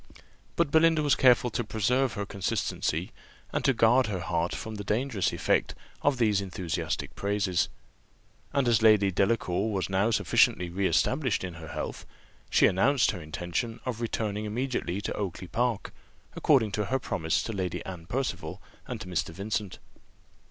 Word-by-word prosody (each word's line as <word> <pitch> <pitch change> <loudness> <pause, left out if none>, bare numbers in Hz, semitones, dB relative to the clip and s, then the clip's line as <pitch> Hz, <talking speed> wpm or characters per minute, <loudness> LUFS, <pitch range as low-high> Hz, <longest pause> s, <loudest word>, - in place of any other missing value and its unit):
But 170 -4 +1
Belinda 160 0 +4
was 145 - +3
careful 125 -1 +4
to 120 - -1
preserve 120 +4 +1
her 100 - -3
consistency, 100 -1 -2 0.4
and - - -1
to - - +5
guard 125 +1 +4
her 95 -4 -3
heart 85 0 -1
from 110 - -6
the 105 -1 -5
dangerous 110 0 0
effect - - 0 0.3
of 140 -2 +2
these 105 -4 +2
enthusiastic 90 -3 -3
praises; 100 -3 0 0.8
and 140 -3 +1
as 115 -2 +4
Lady 105 -3 +5
Delacour 100 +1 +1
was 95 -1 -2
now 95 +4 +2
sufficiently 90 -4 +2
re 95 +2 +1
established 130 -2 +1
in 90 -2 -4
her 80 -1 -9
health, 75 0 -5 0.4
she - - +5
announced 125 +8 +3
her 95 - -7
intention 90 +9 -3
of 120 -3 -3
returning 110 -2 -2
immediately 105 -4 -2
to - - -3
Oakly 95 -2 -4
park, 120 +4 -1 0.4
according 125 -8 +3
to 105 0 -1
her 130 +7 0
promise 80 -10 -1
to 115 - -4
Lady 95 -3 -3
Anne 90 -3 -8
Percival 100 - -3 0.3
and 125 -3 -5
to 90 - -7
Mr. 90 -4 -1
Vincent. 100 +3 -3
105 Hz, 160 wpm, -28 LUFS, 95-120 Hz, 0.8 s, to